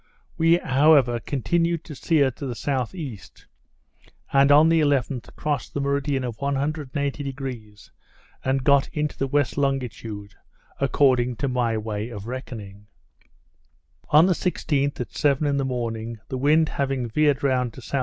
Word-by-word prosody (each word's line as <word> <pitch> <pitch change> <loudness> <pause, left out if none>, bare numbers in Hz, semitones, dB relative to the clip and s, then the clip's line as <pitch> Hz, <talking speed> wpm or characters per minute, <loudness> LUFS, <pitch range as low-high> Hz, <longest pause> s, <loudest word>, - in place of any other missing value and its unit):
We 165 +1 +4
however 135 -5 +4
continued 165 +7 -1
to 155 - -9
steer 140 -1 +2
to 135 +3 -7
the 125 - -4
S.E., 135 - -3 1.1
and 140 +1 +5
on 150 +3 +7
the 165 -1 +4
11th 140 -4 -1
crossed 145 -5 -3
the - - 0
meridian 140 -1 0
of 120 -3 -5
180°, 140 -5 -4 0.5
and 130 0 0
got 140 -1 +4
into 150 -1 -3
the 135 - -2
west 145 +1 0
longitude, 115 -7 -3 0.5
according 130 -3 +2
to 125 +5 -2
my 120 -3 0
way 110 +1 -4
of 105 -4 -8
reckoning. 105 -5 -8 1.2
On 155 +3 +7
the 185 - +3
16th, 145 -5 -1
at 125 - -4
seven 145 0 +2
in 140 -1 +1
the 135 - 0
morning, 115 -3 -3
the 130 - -3
wind 155 +3 +3
having 135 -3 -2
veered 145 +4 +1
round 125 -4 +1
to 130 - -11
S.E. 135 +4 -2
135 Hz, 145 wpm, -24 LUFS, 120-145 Hz, 1.2 s, on